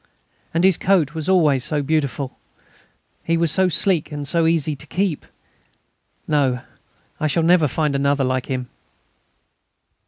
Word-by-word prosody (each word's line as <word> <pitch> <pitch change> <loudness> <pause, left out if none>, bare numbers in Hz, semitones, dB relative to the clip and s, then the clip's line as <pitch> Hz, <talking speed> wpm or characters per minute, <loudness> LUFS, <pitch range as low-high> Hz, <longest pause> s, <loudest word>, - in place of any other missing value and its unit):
And 165 +2 0
his 190 -3 +4
coat 175 -6 +2
was 160 +1 -3
always 150 -9 +3
so 150 0 -1
beautiful; 140 -3 -2 0.9
he 165 0 0
was 165 -2 +2
so 190 +2 +2
sleek 175 -1 0
and 145 -1 -5
so 165 0 +2
easy 160 -2 +1
to 150 +2 -9
keep.... 180 -1 -2 1.0
No, 135 -5 +1 0.6
I 155 - 0
shall 165 +2 +1
never 165 -2 +4
find 150 +1 -1
another 140 0 +1
like 130 -1 -1
him." 130 -2 -3
155 Hz, 145 wpm, -21 LUFS, 140-165 Hz, 1.0 s, his